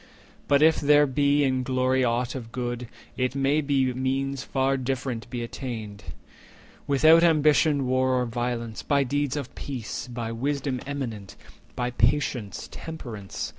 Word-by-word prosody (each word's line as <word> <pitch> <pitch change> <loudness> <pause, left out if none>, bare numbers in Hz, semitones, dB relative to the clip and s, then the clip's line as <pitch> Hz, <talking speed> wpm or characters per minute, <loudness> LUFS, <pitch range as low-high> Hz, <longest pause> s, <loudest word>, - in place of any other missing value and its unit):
But, 140 +1 +4
if 160 0 +5
there 145 0 +5
be 145 +1 +2
in 130 -2 +1
glory 130 0 +1
aught 120 0 0
of 115 -4 -7
good; 120 -1 -4 0.3
It 130 +1 0
may 140 +2 +2
be 135 -3 +1
means 135 +1 -1
far 135 0 0
different 125 -3 -3
be 120 -1 -4
attained, 110 -5 -6 0.8
Without 155 +4 +6
ambition, 155 -3 +4
war, 130 0 +2
or 125 - 0
violence— 120 -1 -3
90 - - -21
By 140 -1 +3
deeds 145 +1 -1
of 140 -4 -5
peace, 125 -6 -5
by 120 -2 -4
wisdom 135 +1 -2
eminent, 115 -9 -5 0.4
By 125 0 -2
patience, 120 -4 0
temperance. 120 -11 -6
130 Hz, 145 wpm, -26 LUFS, 120-140 Hz, 0.8 s, Without